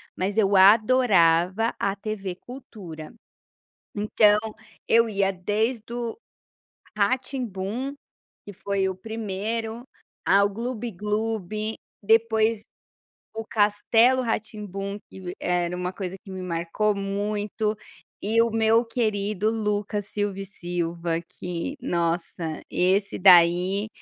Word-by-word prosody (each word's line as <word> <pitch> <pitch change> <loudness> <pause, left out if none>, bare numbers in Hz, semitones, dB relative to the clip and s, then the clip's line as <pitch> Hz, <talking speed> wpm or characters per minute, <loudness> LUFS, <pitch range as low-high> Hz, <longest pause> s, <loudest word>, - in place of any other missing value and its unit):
mas 200 +3 -2
eu 200 -2 +3
adorava 200 -2 +5
a 200 0 0
TV 195 -3 -5
Cultura. 190 - -10 0.9
Então, 210 0 +4 0.5
eu 230 0 +4
ia 195 -2 +1
desde 215 +5 -2
o 240 -1 -3 0.8
Rá-Tim-Bum, 245 +1 -1 0.5
que 205 - -8
foi 195 0 -1
o 190 - -3
primeiro, 220 +3 -4 0.4
ao 200 +1 +4
Glub-Glub, 215 -2 -3 0.3
depois 220 0 +2 0.7
o 225 0 -4
Castelo 225 +5 +3
Rá-Tim-Bum 210 -3 -4
que - - -11
v 180 -1 -6
era 180 0 0
uma 180 0 -3
coisa 190 -1 -5
que 195 - -11
me 185 0 -6
marcou 180 +4 -1
muito, 205 +2 -2 0.5
e 225 +3 +3
o 230 - +2
meu 225 +1 +3
querido 215 -3 0
Lucas 210 -2 -2
Silva 205 -2 -3
e 195 - -4
Silva 170 -2 -3 0.2
que, 180 - -4
nossa, 170 -1 -2
esse 190 +3 +1
daí, 180 +2 +5
205 Hz, 105 wpm, -25 LUFS, 185-225 Hz, 0.9 s, adorava